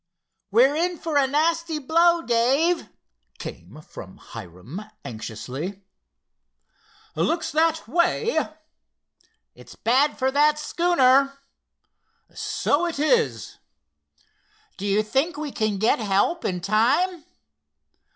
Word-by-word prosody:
"We're 255 +7 +4
in 350 +2 0
for 320 -2 -4
a 280 -2 +4
nasty 325 +3 0
blow, 335 +4 +3
Dave," 270 +9 +1 0.5
came 95 - -9
from 95 -9 -11
Hiram, 110 - -10 0.2
anxiously. 125 - -6 1.3
"Looks 330 0 0
that 320 -1 +1
way." 350 - +1 1.0
"It's - - -15
bad 270 +6 +2
for 265 -1 +1
that 300 +2 +3
schooner." 275 -5 +2 1.0
"So 325 +5 0
it 335 - -4
is." 195 - 0 1.2
"Do 200 - -4
you 205 +2 +2
think 275 +9 -1
we 300 -1 -4
can 215 -4 -1
get 220 +5 +2
help 215 - 0
in 180 -1 -2
time?" 255 - +1
275 Hz, 100 wpm, -24 LUFS, 205-325 Hz, 1.3 s, We're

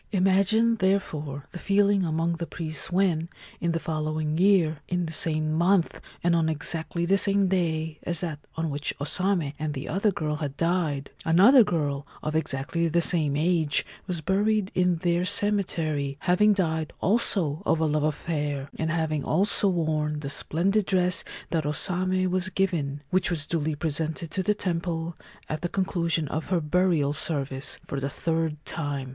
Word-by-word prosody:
Imagine, 200 +4 +3
therefore, 155 -8 -1
the 175 - -7
feeling 200 0 +3
among 165 0 0
the 170 0 -4
priests 155 -1 -6
when, 175 -3 +1 0.3
in 170 - 0
the 165 - -1
following 155 -1 -2
year, 175 -4 +3
in 180 -1 -1
the 160 - -6
same 155 -3 0
month 175 +2 +2 0.2
and 170 0 +3
on 160 -1 +2
exactly 160 +2 -1
the 195 +3 +3
same 200 -1 +2
day 160 -4 -1
as 170 -2 -2
that 160 -5 -4 0.2
on 160 -1 -2
which 145 +1 -3
O - - -3
Same 180 -2 +1
and 155 -1 -3
the 135 - -5
other 195 +5 +1
girl 155 -5 -2
had 145 -3 -5
died, 165 -5 0
another 205 +11 +7
girl 145 -6 -2 0.2
of 155 0 -2
exactly 160 +2 0
the 170 +2 +2
same 160 -4 +1
age 160 -1 +2 0.2
was 175 -3 -2
buried 205 +3 +1
in 180 -1 +2
their 175 +1 0
cemetery, 175 -8 0
having 210 +4 +4
died 160 -5 -1
also 180 -6 +2
of 165 - +1
a 160 - +2
love 150 0 +1
affair, 145 -2 -2
and 160 - 0
having 160 -3 -1
also 200 +5 +2
worn 155 -4 -1
the 140 -1 -4
splendid 195 +8 +1
dress 180 -1 +2 0.3
that 165 -2 +1
O 145 - -1
Same 185 +3 0
was 185 0 0
given, 155 -8 -1
which 185 -1 +2
was 160 -4 -1
duly 155 -2 -1
presented 160 +1 -3
to 190 - -1
the 210 +3 +1
temple, 170 -3 -2 0.3
at 155 - -4
the 175 - -2
conclusion 170 -4 0
of 155 - -4
her 185 -2 +2
burial 160 -2 +1
service, 140 -3 -1
for 140 - -4
the 135 +1 -2
third 160 +1 -1
time. 145 -5 -3
165 Hz, 170 wpm, -26 LUFS, 155-185 Hz, 0.3 s, another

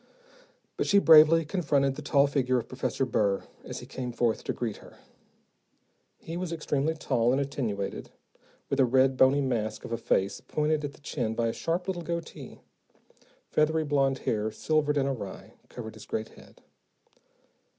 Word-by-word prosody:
But - - -1
she 200 - +4
bravely 165 -2 +7
confronted 145 -5 +1
the 150 - -8
tall 140 -1 +3
figure 130 -3 +1
of 115 - -3
Professor 135 +1 -2
Burr, 100 -5 0 0.2
as - - -7
he - - -9
came 125 -2 -5
forth 120 -1 0
to - - -1
greet 115 -4 -4
her. - - -16 1.2
He 165 +1 -7
was 180 -1 -4
extremely 155 -1 -1
tall 120 -6 +1
and 135 - +2
attenuated, 120 -8 -3 0.6
with 140 - -2
a 130 - +6
red, 130 +2 +3
bony 135 +2 +4
mask 110 -5 -2
of - - -8
a 115 - -1
face 95 +1 0
pointed 150 0 -1
at 145 -1 -4
the - - -19
chin 120 -6 -3
by 115 0 +1
a - - -3
sharp 170 +2 -2
little 185 -2 -2
goatee. 170 0 -6 0.9
Feathery 155 +1 +2
blond 135 -2 +1
hair, 110 -3 -1
silvered 150 +5 0
and 135 -1 +1
awry, 115 -8 -6 0.2
covered 110 -3 -8
his 110 -1 -13
great 110 0 -3
head. - - -18
135 Hz, 170 wpm, -28 LUFS, 120-155 Hz, 1.2 s, bravely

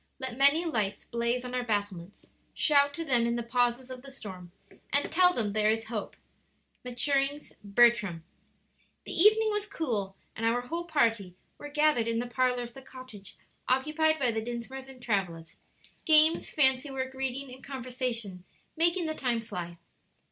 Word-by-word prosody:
Let 260 -3 -5
many 280 +6 +4
lights 215 -11 -2
blaze 235 +1 -1
on 250 - -6
our 250 - 0
battlements; 205 -5 -4 0.2
Shout 285 -2 +4
to 330 - -4
them 240 -5 +2
in 235 - 0
the 240 - -2
pauses 245 +2 0
of 255 -1 -8
the 275 - -12
storm, 190 -9 -10 0.4
And 285 +1 +1
tell 360 +1 +5
them 215 - -2
there 215 0 +2
is 225 0 -1
hope." 210 - -4 0.7
Maturings 275 +3 -1
"Bertram." 205 -5 +3 0.8
The - - -7
evening 430 +4 +5
was 420 0 -2
cool, 220 - -3 0.2
and 225 - -6
our 230 +2 +2
whole 335 +7 -5
party 225 - 0 0.2
were 290 - -8
gathered 295 -6 +2
in 230 0 0
the 240 - -1
parlor 250 0 0
of 240 0 -9
the 270 - -11
cottage 255 -7 -11 0.3
occupied 310 +4 +2
by 255 -5 +1
the 220 0 -2
Dinsmores 240 +3 -6
and 265 -1 -13
Travillas 175 -7 -2 0.5
games, 315 0 +5
fancy 265 -1 +3
work, 260 -1 -4
reading, 265 0 -4
and 260 - -13
conversation 250 -7 -4 0.3
making 340 +2 +2
the 315 - -1
time 245 -6 -1
fly. 175 -5 -7
250 Hz, 165 wpm, -29 LUFS, 225-280 Hz, 0.8 s, tell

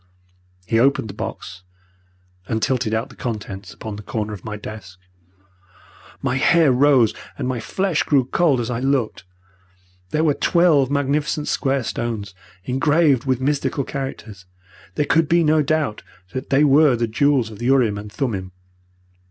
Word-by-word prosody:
"He 115 +4 +1
opened 125 -4 +2
the - - -13
box, 90 -2 -7 0.9
and 110 - -1
tilted 125 -1 0
out 110 +1 -1
the - - -15
contents 105 -5 -6
upon 110 -2 -7
the - - -7
corner 105 0 -4
of 95 - -9
my 105 -1 -5
desk. 105 -4 -9 1.3
My 135 -1 0
hair 160 +1 +4
rose 130 -3 +4 0.2
and 130 - -3
my 130 -2 -2
flesh 185 - -1
grew 135 -4 +2
cold 145 -1 +2
as 120 0 -3
I 115 - -2
looked. 130 -6 -1 0.8
There 155 +8 0
were 155 -3 +3
twelve 160 -5 +3
magnificent 145 +1 -1
square 135 -2 0
stones 110 -5 -4 0.3
engraved 140 - +2
with 130 -1 0
mystical 140 0 0
characters. 115 -9 -7 0.5
There 145 - +1
could 165 +1 +2
be 170 0 +4
no 155 0 +3
doubt 150 -6 -1 0.3
that 130 - -5
they 140 +2 +4
were 145 -1 +5
the 120 0 0
jewels 125 0 +1
of 105 - -11
the 120 - -2
urim 120 -6 +3
and 105 0 -9
thummim. 100 -8 -3
130 Hz, 160 wpm, -21 LUFS, 110-145 Hz, 1.3 s, were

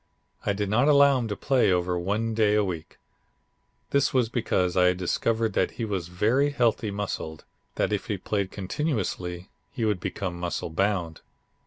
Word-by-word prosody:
I 100 - +3
did 105 0 -2
not 120 +8 +3
allow 140 -2 +6
him 120 - -2
to 105 - -3
play 125 -2 +2
over 90 0 +1
one 105 +6 -1
day 105 -1 +3
a 105 - +3
week. 85 -5 -5 0.9
This 140 0 +3
was 125 -4 +2
because 95 -7 0
I 90 -1 +5
had 90 0 +3
discovered 110 +4 0
that - - +1
he 115 - -1
was 95 -5 -3
very 115 +11 +2
heavily 120 -5 +1
muscled; 100 -6 -4 0.3
that - - 0
if 100 - -2
he 105 -4 -1
played 100 +1 -2
continuously 95 - -3 0.2
he 115 - -2
would 105 -4 +1
become 90 -1 -4
muscle 85 -2 -3
bound. 90 -2 -1
105 Hz, 175 wpm, -26 LUFS, 90-115 Hz, 0.9 s, allow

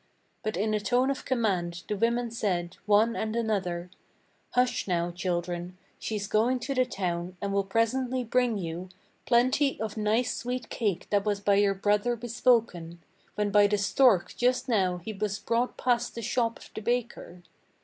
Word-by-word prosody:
But 215 -4 -3
in 215 +3 0
a 210 - +1
tone 250 +5 +2
of 275 - -5
command 185 -9 -1
the 210 - -1
women 235 +2 0
said, 180 -6 -2
one 215 +3 +4
and 220 -1 -2
another: 185 -6 -1 0.6
"Hush 250 -3 +1
now, 175 -1 0
children, 175 0 -3 0.2
she's 210 -2 -3
going 225 +5 +2
to 270 +4 -2
the 255 -1 +2
town, 180 -4 -3
and 200 -1 -3
will 200 0 +2
presently 245 +5 0
bring 245 -1 +1
you 175 0 -5 0.4
Plenty 255 +4 +3
of 220 0 -4
nice 215 +3 +1
sweet 245 -1 -4
cake 205 -7 -1
that 205 -1 +3
was 205 -1 0
by 200 0 +2
your 200 -1 +3
brother 205 +4 +1
bespoken 225 -7 0 0.4
When 210 -1 0
by 205 0 +6
the 210 0 +1
stork 200 -1 +3
just 250 +2 +1
now 190 -7 +1
he 190 +5 -6
was 205 0 -2
brought 235 +2 -1
past 245 -1 0
the 230 - -5
shop 230 +1 0
of - - -15
the - - -6
baker. 235 -6 -3
215 Hz, 170 wpm, -28 LUFS, 190-240 Hz, 0.6 s, by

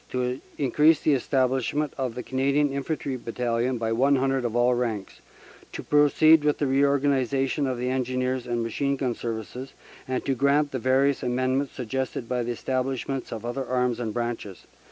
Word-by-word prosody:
to 125 0 -2 0.2
increase 150 +3 +3
the 155 - +3
establishment 135 +2 0
of 130 -4 -3
the 125 - -5
Canadian 140 +2 +1
Infantry 140 -1 -3
Battalion 120 +1 -1
by 115 -1 -2
100 135 +2 +2
of 120 -1 -2
all 120 +1 +3
ranks, 115 -5 -3 0.5
to - - -6
proceed 150 +1 +5
with 150 -1 +2
the 145 - 0
reorganization 135 0 +1
of 130 -2 -2
the 125 +1 -1
Engineers 130 0 -1
and 120 -1 -1
Machine 140 +5 -1
Gun 130 -3 -1
Services, 115 +3 -6 0.3
and 130 0 -2
to 135 - +1
grant 140 +3 +2
the 130 - -3
various 135 +3 +2
amendments 130 +2 0
suggested 130 0 -4
by 125 +1 -1
establishments 130 +2 -2
of 115 0 -6
other 120 +3 -3
Arms 125 -2 0
and 115 -3 -2
Branches. 120 -5 -4
130 Hz, 160 wpm, -25 LUFS, 120-140 Hz, 0.5 s, proceed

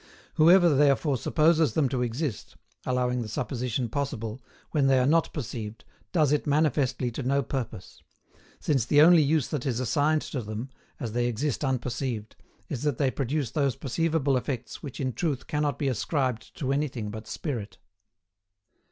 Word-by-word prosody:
Whoever 170 +1 +6
therefore 140 0 +3
supposes 155 +1 +3
them 150 -4 +3
to 130 -1 -1
exist 120 - -3 0.3
(allowing 125 -1 +1
the 115 - -4
supposition 120 +2 -2
possible) 115 -2 -3 0.3
when 140 -3 +2
they 135 -1 +5
are 125 - +3
not 165 +4 +3
perceived 115 -6 -6 0.3
does 155 -5 +3
it 150 0 +1
manifestly 140 -4 +1
to 115 - -5
no 135 +2 +1
purpose; 120 -8 -5 0.6
since 135 -6 +1
the 145 +4 +3
only 165 +2 +8
use 150 -1 +1
that 145 -5 -2
is 125 -4 -1
assigned 145 +5 +1
to 130 - -4
them, 110 +4 -6 0.3
as 115 - -4
they 120 +1 0
exist 125 +5 -2
unperceived, 125 -4 -2 0.3
is 130 -5 -4
that 145 -5 0
they 135 -2 +2
produce 135 -2 -2
those 140 -5 +1
perceivable 145 0 0
effects 125 -2 -4
which 140 - -8
in 130 -2 -1
truth 135 0 -2
cannot 150 -2 -1
be 140 - -1
ascribed 130 -3 -2
to 135 -2 -1
anything 130 -7 -2
but 110 +1 -8
Spirit. 115 - -5
135 Hz, 160 wpm, -27 LUFS, 120-150 Hz, 0.6 s, only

